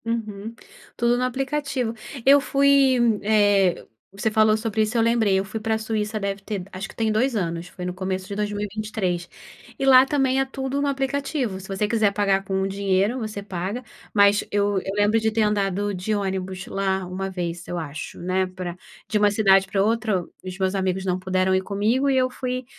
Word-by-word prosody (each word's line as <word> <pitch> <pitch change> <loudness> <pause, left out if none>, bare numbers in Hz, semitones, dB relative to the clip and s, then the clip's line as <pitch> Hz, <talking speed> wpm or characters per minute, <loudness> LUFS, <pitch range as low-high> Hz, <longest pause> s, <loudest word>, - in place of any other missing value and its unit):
Uhum, 225 -2 -4 0.4
tudo 240 0 +2
no 250 - 0
aplicativo. 270 -1 -2 0.3
Eu 280 +1 +7
fui 275 -2 +4 0.2
eh, 205 -3 +3 0.3
você 195 +3 -1
falou 215 0 +4
sobre 220 -1 -1
isso, 215 +2 0
eu - - +4
lembrei 225 -3 +3
eu 195 - -2
fui 215 +3 -5
pra 220 0 0
Suíça 220 -1 -2
deve 200 0 -3
ter 200 -2 -4
acho 190 +2 -5
que - - -13
tem 225 -1 0
2 250 +5 +1
anos, 170 -4 -3
foi 180 - -7
no 180 - -3
começo 185 0 -3
de 200 - -5
2023, 205 -3 -3 0.5
e 270 - 0
lá 260 -1 +8
também 270 -1 +1
é - - +1
tudo 265 +1 -3
no 285 - +1
aplicativo, 275 -4 -2
se 190 - -11
você 195 +2 -1
quiser 215 -2 +2
pagar 200 -1 +1
com 190 0 -1
dinheiro, 200 +4 0
você 215 -3 -5
paga, 195 +4 -4 0.3
mas 200 0 +5
eu 205 -1 +1
eu 195 - -4
lembro 205 +2 +3
de 220 0 0
ter 220 0 +1
andado 205 -1 0
de 185 +4 -2
ônibus 190 -2 -3
lá 190 -1 -1
1 190 +2 -4
vez, 175 -2 -4
eu 175 - -3
acho, 155 -3 -6
né, 185 +1 0
pra 185 -2 -6 0.3
de 215 - 0
uma 205 0 +4
cidade 195 -2 +4
pra 195 - 0
outra, 220 -3 +1
o - - -14
os 185 0 -7
meus 190 0 0
amigos 190 0 -1
não 180 -1 0
puderam 185 0 +1
ir 190 - +2
comigo 215 +8 0
e 270 - +2
eu 255 0 +2
fui 255 0 -4
205 Hz, 200 wpm, -23 LUFS, 190-230 Hz, 0.5 s, lá